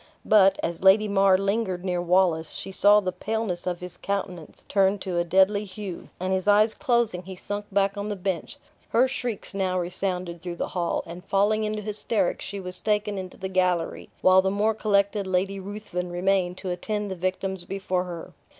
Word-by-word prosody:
But, 195 Hz, -2 st, +5 dB
as 170 Hz, -1 st, -3 dB
Lady 195 Hz, +3 st, +6 dB
Mar 195 Hz, -2 st, +4 dB
lingered 195 Hz, -2 st, -1 dB
near 180 Hz, -2 st, 0 dB
Wallace, 175 Hz, -3 st, +2 dB
she -, -, -6 dB
saw 205 Hz, +2 st, +5 dB
the 185 Hz, -2 st, -2 dB
paleness 205 Hz, -3 st, -3 dB
of 175 Hz, -1 st, -2 dB
his 180 Hz, -1 st, -8 dB
countenance 190 Hz, -5 st, -5 dB
turn 195 Hz, 0 st, +3 dB
to 185 Hz, -3 st, -2 dB
a -, -, +2 dB
deadly 190 Hz, +4 st, +3 dB
hue, 195 Hz, -2 st, -7 dB
and 185 Hz, +1 st, -1 dB
his 190 Hz, +1 st, -1 dB
eyes 210 Hz, +2 st, +5 dB
closing, 235 Hz, -10 st, +1 dB
he 190 Hz, +1 st, -9 dB
sunk 205 Hz, +3 st, -5 dB
back 195 Hz, 0 st, +2 dB
on 205 Hz, +1 st, -3 dB
the 205 Hz, -, -2 dB
bench. 185 Hz, -3 st, -3 dB, 0.3 s
Her 250 Hz, +3 st, +4 dB
shrieks 245 Hz, -6 st, -4 dB
now 190 Hz, -2 st, 0 dB
resounded 180 Hz, -1 st, -3 dB
through 175 Hz, -1 st, -5 dB
the -, -, -3 dB
hall, 175 Hz, -2 st, -1 dB
and, 175 Hz, +2 st, -9 dB
falling 205 Hz, +3 st, +2 dB
into 210 Hz, 0 st, -3 dB
hysterics, 210 Hz, -2 st, -1 dB
she 200 Hz, -, -5 dB
was 180 Hz, -1 st, -7 dB
taken 210 Hz, -1 st, 0 dB
into 185 Hz, -1 st, -8 dB
the 190 Hz, -, -4 dB
gallery; 180 Hz, -3 st, 0 dB
while 185 Hz, 0 st, +6 dB
the 190 Hz, -, 0 dB
more 210 Hz, +3 st, +1 dB
collected 200 Hz, -1 st, +1 dB
Lady 190 Hz, +1 st, 0 dB
Ruthven 195 Hz, -2 st, -5 dB
remained 180 Hz, 0 st, 0 dB
to 190 Hz, -1 st, -4 dB
attend 210 Hz, +3 st, -3 dB
the -, -, -3 dB
victims 185 Hz, +1 st, -2 dB
before 185 Hz, -1 st, -2 dB
her. 170 Hz, -2 st, -8 dB
190 Hz, 190 wpm, -25 LUFS, 180-205 Hz, 0.3 s, Lady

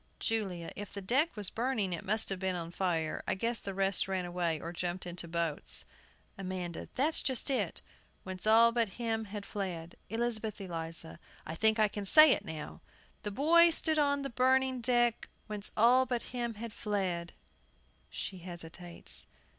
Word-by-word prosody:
JULIA. 190 Hz, -7 st, -2 dB
If 205 Hz, -1 st, -7 dB
the 200 Hz, -, -5 dB
deck 270 Hz, -, +2 dB
was 205 Hz, -3 st, 0 dB
burning, 225 Hz, -6 st, 0 dB
it 170 Hz, -, -4 dB
must 215 Hz, +3 st, +1 dB
have 195 Hz, -1 st, -3 dB
been 190 Hz, -1 st, -1 dB
on 170 Hz, -1 st, -5 dB
fire. 170 Hz, -4 st, -1 dB
I -, -, +1 dB
guess 230 Hz, +4 st, -1 dB
the 195 Hz, -1 st, -6 dB
rest 195 Hz, 0 st, +1 dB
ran 190 Hz, -2 st, -1 dB
away, 175 Hz, -2 st, -1 dB
or 170 Hz, +2 st, -6 dB
jumped 175 Hz, +1 st, -3 dB
into 175 Hz, -1 st, -2 dB
boats. 165 Hz, -2 st, -3 dB, 0.5 s
AMANDA. 185 Hz, -3 st, -5 dB
That's 300 Hz, +5 st, +3 dB
just 260 Hz, 0 st, 0 dB
it: 210 Hz, -10 st, -1 dB, 0.4 s
"Whence 185 Hz, +2 st, -5 dB
all 230 Hz, +2 st, +7 dB
but 230 Hz, -2 st, +1 dB
him 225 Hz, -2 st, -1 dB
had 205 Hz, 0 st, -7 dB
fled." 175 Hz, -4 st, -5 dB
ELIZABETH 225 Hz, -1 st, 0 dB
ELIZA. 165 Hz, -3 st, -3 dB, 0.3 s
I 160 Hz, -, -5 dB
think 220 Hz, +6 st, +3 dB
I 215 Hz, -1 st, +5 dB
can 205 Hz, 0 st, -5 dB
say 310 Hz, +8 st, +9 dB
it 205 Hz, -, +2 dB
now. 160 Hz, -6 st, -7 dB, 0.4 s
"The 210 Hz, -, -3 dB
boy 330 Hz, +10 st, +6 dB
stood 315 Hz, -1 st, +2 dB
on 285 Hz, -1 st, +2 dB
the 275 Hz, -, -4 dB
burning 260 Hz, +1 st, +2 dB
deck, 240 Hz, -1 st, +2 dB, 0.2 s
Whence 210 Hz, -1 st, -6 dB
all 250 Hz, +4 st, +5 dB
but 245 Hz, -2 st, -1 dB
him 240 Hz, -2 st, -2 dB
had 225 Hz, +1 st, -7 dB
fled 185 Hz, -5 st, -2 dB, 0.4 s
" -, -, -36 dB
[She 190 Hz, -, -6 dB
hesitates. 175 Hz, 0 st, -5 dB
205 Hz, 175 wpm, -32 LUFS, 175-235 Hz, 0.5 s, say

